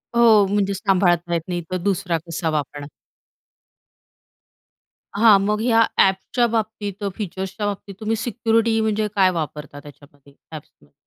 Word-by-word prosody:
हो, 225 -4 +6
म्हणजे 200 0 0
सांभाळता 180 -3 +1
येत 170 - 0
नाही, 175 -1 -3
तर 185 - 0
दुसरा 180 -2 -1
कसा 165 0 -3
वापरणार? 145 -1 -4 2.3
हां, 210 -1 +6
मग 210 +2 -1
ह्या 230 -1 +4
ॲप्सच्या 195 +6 +2
बाबतीत 215 -3 -4
फीचर्सच्या 195 +1 -5
बाबतीत 200 -1 -5
तुम्ही 220 +1 -1
सिक्युरिटी 225 0 0
म्हणजे 215 0 0
काय 190 -2 +4
वापरता 150 -3 -6
त्याच्यामध्ये 145 -1 -17 0.2
ॲप्समध्ये? 150 - -13
195 Hz, 125 wpm, -21 LUFS, 170-220 Hz, 2.3 s, हो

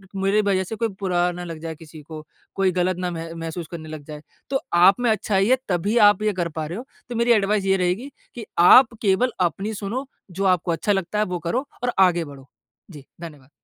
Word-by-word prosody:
मेरी 195 +2 +2
वज़ह 195 -2 +1
से 205 +4 -6
कोई 230 +1 0
बुरा 180 -2 +1
ना 175 0 -7
लग 165 -2 -7
जाए 165 -1 -5
किसी 155 -1 -13
को, 155 +1 -10 0.3
कोई 190 -1 +2
गलत 180 0 0
ना 180 -1 -2
मह 165 0 -6
महसूस 165 0 -6
करने 160 -2 -8
लग 155 -1 -8
जाए 150 -1 -8 0.3
तो 270 -1 0
आप 185 +5 +6
में 245 - +1
अच्छाई 205 -1 +1
है 260 - +5
तभी 195 +5 0
आप 205 +1 -1
ये 215 - +1
कर 175 -3 -2
पा 155 - -2
रहे 170 +5 -6
हो 245 - -7 0.2
तो 240 - -5
मेरी 235 +1 +2
एडवाइस 205 -1 +1
ये 195 0 +3
रहेगी 190 +10 -1 0.2
कि 235 -3 -7 0.2
आप 250 -2 +8
केवल 210 +5 +2 0.2
अपनी 205 +5 -5
सुनो 215 +6 -4 0.3
जो 195 +3 -3
आपको 180 -2 +2
अच्छा 165 +5 -1
लगता 195 +1 -1
है 210 - +2
वो 180 -3 -4
करो 245 +12 -2 0.2
और 245 - +1
आगे 175 -3 +4
बढ़ो। 140 -2 -13 0.4
जी, 145 -4 -12 0.2
धन्यवाद। 150 -5 -11
185 Hz, 230 wpm, -22 LUFS, 165-210 Hz, 0.4 s, आप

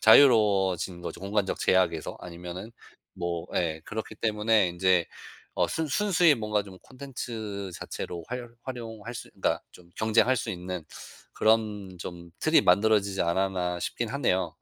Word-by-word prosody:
자유로워진 100 -8 +5
거죠 85 - -6
공간적 100 0 -1
제약에서. 85 -4 +1
아니면은 90 +4 -7 0.4
뭐 85 -1 -3
예 80 -2 0
그렇기 110 0 -5
때문에 105 -2 +2
인제 90 0 +3 0.5
어 - - +2
순 160 - -1
순수히 175 -1 +4
뭔가 105 -3 0
좀 95 -2 -12
콘텐츠 115 -7 -6
자체로 85 -2 -6
활 125 -1 -5
활용할 115 -3 -6
수 110 - -7
그니까 - - 0
좀 85 -1 -17
경쟁할 110 +4 +3
수 - - -3
있는 90 -1 -5 0.5
그런 105 -4 +1
좀 85 -1 -8
틀이 155 +1 +5
만들어지지 100 -2 +3
않았나 90 0 0
싶긴 120 +5 -2
하네요. 95 - 0
100 Hz, 310 characters per minute, -28 LUFS, 90-115 Hz, 0.5 s, 자유로워진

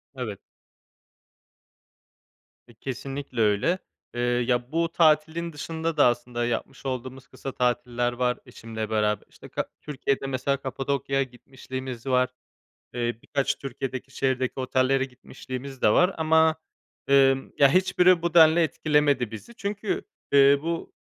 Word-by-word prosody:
Evet. 110 -6 -5 2.3
E, 120 - -17
kesinlikle 135 +1 -5
öyle. 110 - +2 0.3
Eee, 120 - -3
ya, 120 +1 0
bu 165 +1 0
tatilin 160 +1 +2
dışında 160 +2 -3
da - - +6
aslında 120 0 -1
yapmış 125 +4 -4
olduğumuz 130 0 -5
kısa 135 - -7
tatiller 120 -1 0
var 125 0 0
eşimle 110 -1 -6
beraber. 105 -1 0
İşte, - - -14
ka - - -2 0.2
Türkiye'de 140 -2 -2
mesela 135 +1 0
Kapadokya'ya 135 0 -1
gitmişliğimiz 130 0 -8
var. 125 -1 +2 0.7
Eee, 120 -1 -1
birkaç 140 -1 0
Türkiye'deki 135 0 -5
şehirdeki 130 -1 0
otellere 130 +1 +2
gitmişliğimiz 130 0 -9
de - - +6
var 180 - +4
ama, 160 0 +4 0.5
emm, 135 -1 +4
ya 140 - +7
hiçbiri 180 +1 +4
bu 170 -1 -1
denli 160 0 +7
etkilemedi 150 -5 +2
bizi 115 - -10
çünkü, 205 0 -3 0.3
eee, 140 0 +7
bu 165 +1 -3
135 Hz, 125 wpm, -26 LUFS, 125-155 Hz, 2.3 s, ya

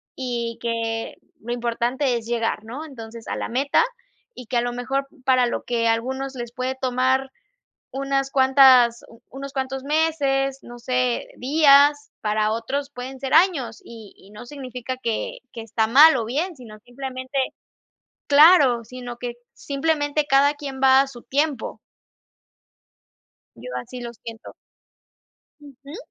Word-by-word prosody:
y 235 -3 -3
que 230 -1 -3 0.3
lo 240 +2 -4
importante 240 +2 -1
es 225 - -8
llegar, 230 -2 -1
¿no? 265 +8 -7
Entonces, 230 -5 -10
a - - -3
la - - -4
meta, 275 - +2 0.6
y 250 - -9
que 245 - -1
a 235 - +3
lo 245 - -2
mejor 270 +3 -2 0.2
para 255 -2 +4
lo - - -3
que 230 -1 0
a 225 - +5
algunos 265 +3 -4
les 240 -1 -6
puede 255 0 -3
tomar 260 +1 +1 0.6
unas 275 0 -1
cuantas 260 -3 +5
u 230 - -17
unos 275 +1 -8
cuantos 265 0 -4
meses, 280 -3 0
no 240 0 -11
sé, 250 0 -1
días, 290 +1 +4
para 215 0 +1
otros 275 +5 -3
pueden 260 0 -8
ser 265 -1 -2
años, 310 - +2
y 225 -3 -12
y 195 - -19
no 215 +3 -11
significa 255 -2 -6
que - - -3
que 230 - -7
está 220 0 0
mal 285 +4 +8
o 230 - -2
bien, 320 +9 -2
sino 220 -4 -12
simplemente 260 +2 -7 0.9
Claro, 285 -5 +6
sino 245 0 -9
que 245 -1 -4 0.2
simplemente 290 +1 -1
cada 280 +1 +4
quien 275 -3 -7
va 265 0 +6
a 275 - -4
su 245 -3 -12
tiempo. 280 0 -2 1.8
Yo - - -9
así 250 +1 -7
lo 235 -1 -6
siento. 225 0 -11 1.1
Ujú. 280 +2 -12
260 Hz, 150 wpm, -23 LUFS, 235-275 Hz, 1.8 s, mal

